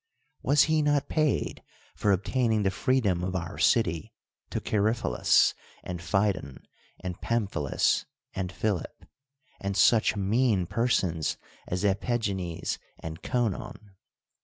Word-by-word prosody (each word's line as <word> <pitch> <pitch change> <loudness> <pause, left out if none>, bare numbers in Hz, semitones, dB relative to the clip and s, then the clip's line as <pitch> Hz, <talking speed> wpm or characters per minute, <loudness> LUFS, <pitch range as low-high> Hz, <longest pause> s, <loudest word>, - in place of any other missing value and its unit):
Was 145 +1 +5
he 155 -1 +2
not 145 -1 +1
paid 155 -2 0 0.3
for 105 - +1
obtaining 110 +3 +1
the 95 - +2
freedom 105 -6 +1
of 95 0 -2
our 85 -1 -4
city 85 -9 +2 0.4
to - - -2
Chaerephilus, 110 - +2 0.3
and 90 -1 -5
Phidon, 95 -7 -1 0.4
and 90 -1 -5
Pamphilus, 100 - 0 0.3
and 90 -1 -3
Philip, 95 -1 -3 0.5
and 100 0 -3
such 110 +4 +4
mean 105 -1 +2
per 115 +7 0
sons 85 -10 0 0.3
as 90 +2 -2
Epigcncs 100 -4 -1 0.2
and 80 0 -7
Conon 110 -3 -2
100 Hz, 115 wpm, -28 LUFS, 90-115 Hz, 0.5 s, Was